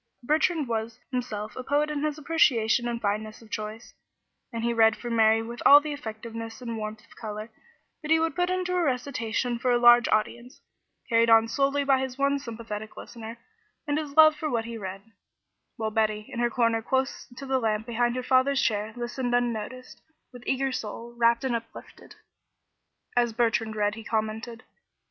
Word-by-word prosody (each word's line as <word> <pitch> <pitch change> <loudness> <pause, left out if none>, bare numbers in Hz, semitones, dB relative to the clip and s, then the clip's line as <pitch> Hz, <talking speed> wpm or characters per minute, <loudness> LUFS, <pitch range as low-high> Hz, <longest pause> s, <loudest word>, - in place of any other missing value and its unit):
Bertrand 305 +2 +1
was 225 0 -3
himself 215 -4 -4
a 255 - -5
poet 295 +3 +1
in 295 -1 -2
his 305 -1 -1
appreciation 255 -7 +2
and 235 -1 -2
fineness 215 0 -2
of 215 - -18
choice, 215 +1 -6 0.6
and 230 -1 -4
he 235 0 +1
read 225 -1 +5
for 240 - -6
Mary 225 0 +4
with 235 +1 -8
all 285 - +9
the 300 0 -5
effectiveness 225 -3 -7
and 235 -2 -5
warmth 215 +1 -6
of - - -20
color 215 0 -7 0.5
that 305 - -7
he 320 0 +5
would 325 -2 0
put 355 0 +1
into 365 0 -1
a 360 - +2
recitation 250 -4 -1
for 250 - 0
a 245 - +4
large 240 0 +7
audience, 235 +4 -1 0.5
carried 230 -1 +3
on 225 0 +6
solely 275 +4 +1
by 270 -1 +3
his 260 -1 -4
one 280 0 +1
sympathetic 225 -4 -7
listener 230 -1 -9 0.5
and 295 0 0
his 295 -1 -7
love 310 -1 +8
for 305 0 -3
what 230 -4 -1
he 235 0 -6
read; 195 -2 -6 0.7
while 220 -2 -3
Betty, 215 -1 0
in 235 - -4
her 240 0 +2
corner 230 -1 +1
close 265 +3 -1
to 275 - -7
the 265 -1 +1
lamp 220 -2 -1
behind 240 +1 0
her 255 - -3
father's 265 +2 +3
chair, 215 -2 0
listened 245 +1 -2
unnoticed, 245 +1 -3 0.3
with 245 - -11
eager 270 0 0
soul, 235 0 -6
rapt 235 0 +3
and 255 -3 0
uplifted. 230 0 -9 1.0
As 240 -2 +2
Bertrand 225 -1 0
read 205 -1 +1
he 225 +1 -9
commented. 220 +2 -3
235 Hz, 185 wpm, -27 LUFS, 220-265 Hz, 1.0 s, all